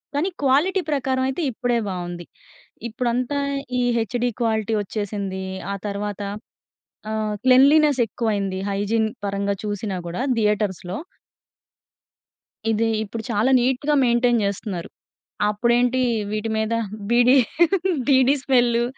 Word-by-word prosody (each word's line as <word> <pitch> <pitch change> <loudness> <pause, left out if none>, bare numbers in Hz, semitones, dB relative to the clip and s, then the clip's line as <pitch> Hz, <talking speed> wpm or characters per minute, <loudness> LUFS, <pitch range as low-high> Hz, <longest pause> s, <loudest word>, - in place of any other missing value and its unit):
కానీ 320 +7 +1
క్వాలిటీ 330 +9 +3
ప్రకారమయితే, 265 +1 0
ఇప్పుడే 240 0 0
బావుంది. 175 -1 -5 0.7
ఇప్పుడంతా 250 +4 -1 0.4
ఈ - - +1 0.2
హెచ్‍డి 240 +2 -1
క్వాలిటీ 220 -1 0
ఒచ్చేసిందీ. 200 -2 -4 0.3
ఆ - - -3
తర్వాత 205 0 -4 0.9
ఆహ్, 215 -1 -1
క్లెన్లీనెసెక్కువైంది 250 -8 +3
హైజీన్ 210 +3 0 0.2
పరంగా 200 0 -1
చూసినా 205 -1 -3
గూడా 175 +8 -4 0.2
థియేటర్స్‌లో. 205 -3 0 1.7
ఇది 225 +1 +1 0.2
ఇప్పుడు 220 +2 -6
చాలా 225 +4 +2
నీట్‌గా 265 +4 +1
మెయింటైన్ 240 -1 +3
చేస్తున్నారు. 200 -3 -3 0.6
అప్పుడేంటి 240 +4 +2 0.3
వీటి 215 +1 -2
మీద 220 +1 0 0.4
బీడీ 245 +3 +5 0.7
బీడీ 265 0 +5
స్మెల్లు. 240 -3 +3
230 Hz, 100 wpm, -22 LUFS, 205-255 Hz, 1.7 s, బీడీ